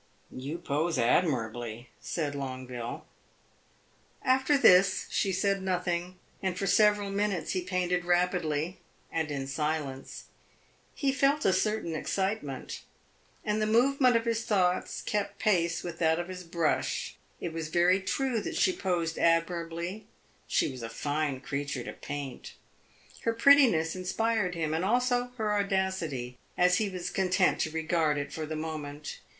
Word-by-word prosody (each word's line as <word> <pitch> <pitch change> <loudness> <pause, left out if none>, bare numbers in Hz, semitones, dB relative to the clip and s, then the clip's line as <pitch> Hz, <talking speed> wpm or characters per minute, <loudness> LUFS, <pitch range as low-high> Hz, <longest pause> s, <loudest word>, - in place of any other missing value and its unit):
"You 140 +6 -4
pose 160 -1 -1
admirably," 120 -4 0
said 150 -4 -3
Longueville. 130 -3 -5 1.2
After 265 +3 +3
this 190 -6 +5
she 195 - +1
said 195 +1 +1
nothing, 180 -1 -2 0.2
and 190 -2 -1
for 195 - -1
several 210 0 +3
minutes 200 -3 -1
he 185 - 0
painted 180 -1 0
rapidly 175 -2 0 0.3
and 160 -2 -1
in 140 -2 -3
silence. 140 -1 -3 0.7
He 275 -3 +1
felt 275 +2 +2
a 190 - +5
certain 210 -2 0
excitement, 190 -6 -3 0.6
and 210 +1 0
the 215 - +1
movement 250 +3 +4
of 230 0 +2
his 230 -1 0
thoughts 185 -4 +1
kept 210 -1 -2
pace 170 -5 +1
with 170 -1 -6
that 160 -1 +3
of 175 +1 -4
his 180 -1 -6
brush. 165 -2 -1 0.2
It 170 - -4
was 165 -1 -3
very 175 +4 +3
true 240 +4 0
that - - -4
she 185 - +3
posed 170 -4 -1
admirably; 170 +3 0 0.4
she - - +1
was 130 -2 -8
a 115 - -5
fine 145 +2 -2
creature 140 -2 -3
to - - -6
paint. 145 -3 -7 0.7
Her 230 - +1
prettiness 230 - +5
inspired 190 +1 0
him, 160 -2 -1
and 160 +2 0
also 245 +3 +2
her 215 -2 0
audacity, 190 -11 -1 0.2
as 180 0 +4
he 215 -2 0
was 185 -2 -4
content 185 -1 +2
to - - 0
regard 160 -1 +1
it 145 0 -4
for 155 -1 -4
the 155 - -4
moment. 155 -2 -5
175 Hz, 145 wpm, -29 LUFS, 155-200 Hz, 1.2 s, this